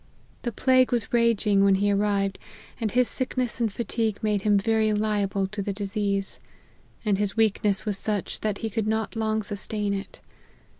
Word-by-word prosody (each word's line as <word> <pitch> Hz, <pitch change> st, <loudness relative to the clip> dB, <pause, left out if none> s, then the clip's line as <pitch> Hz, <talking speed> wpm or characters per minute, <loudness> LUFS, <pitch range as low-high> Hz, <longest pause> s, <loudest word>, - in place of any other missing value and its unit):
The 240 Hz, -, -2 dB
plague 255 Hz, +2 st, +3 dB
was 240 Hz, -2 st, -1 dB
raging 225 Hz, -4 st, +3 dB
when 200 Hz, -1 st, +5 dB
he 205 Hz, +1 st, +2 dB
arrived, 200 Hz, -1 st, 0 dB, 0.4 s
and 225 Hz, -2 st, 0 dB
his 250 Hz, +2 st, +2 dB
sickness 255 Hz, -2 st, -2 dB
and 230 Hz, -3 st, +1 dB
fatigue 225 Hz, -1 st, -1 dB
made 210 Hz, -2 st, +1 dB
him 205 Hz, 0 st, +3 dB
very 220 Hz, +1 st, +2 dB
liable 205 Hz, -2 st, 0 dB
to 210 Hz, 0 st, -4 dB
the 200 Hz, 0 st, -2 dB
disease; 200 Hz, -1 st, -2 dB, 0.7 s
and 200 Hz, -2 st, +2 dB
his 205 Hz, +1 st, -1 dB
weakness 210 Hz, -2 st, +2 dB
was 205 Hz, -2 st, -2 dB
such, 210 Hz, -3 st, -2 dB
that 210 Hz, -2 st, -1 dB
he 220 Hz, -, -3 dB
could 220 Hz, -1 st, -1 dB
not 220 Hz, +1 st, -1 dB
long 220 Hz, -1 st, 0 dB
sustain 205 Hz, 0 st, -2 dB
it. 195 Hz, 0 st, -6 dB
210 Hz, 170 wpm, -26 LUFS, 200-225 Hz, 0.7 s, when